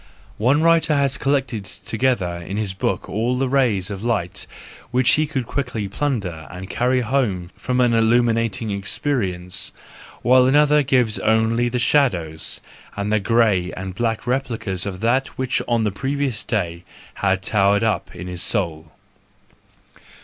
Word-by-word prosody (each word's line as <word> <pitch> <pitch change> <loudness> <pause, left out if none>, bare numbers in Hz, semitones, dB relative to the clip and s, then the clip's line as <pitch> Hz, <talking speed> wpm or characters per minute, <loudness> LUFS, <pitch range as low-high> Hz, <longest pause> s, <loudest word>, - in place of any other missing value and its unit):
One 135 +8 +3
writer 165 -2 +4
has 140 -1 +1
collected 135 -6 0
together 105 -4 -1
in 90 +4 -6
his 105 -3 -2
book 95 - -2
all 115 +5 -1
the 135 +1 0
rays 120 -8 +1
of 100 +1 -6
light 105 -7 -1 0.4
which 125 0 +3
he 155 0 +3
could 135 -4 -2
quickly 120 -5 -3
plunder 100 - -3
and 90 +1 -8
carry 125 +1 +1
home 105 -8 -1
from 125 0 -2
an 120 -2 +3
illuminating 115 -1 +2
experience; 95 -4 -2 0.5
while 125 +1 +5
another 150 +2 +5
gives 125 -5 +1
only 115 +2 +2
the 125 - -2
shadows, 95 - +1 0.4
and 100 +1 -1
the 110 - +3
grey 105 -4 +2
and 95 0 -6
black 115 +3 -2
replicas 115 -8 -2
of 95 -2 -6
that 130 +4 +2
which 130 -1 0
on 115 -2 +1
the 105 - 0
previous 135 +1 -2
day 85 -6 -2 0.3
had 95 -1 0
towered 100 0 +2
up 110 -1 -1
in 90 - -7
his 90 -1 -3
soul. 80 -4 -1
115 Hz, 150 wpm, -21 LUFS, 95-130 Hz, 0.5 s, while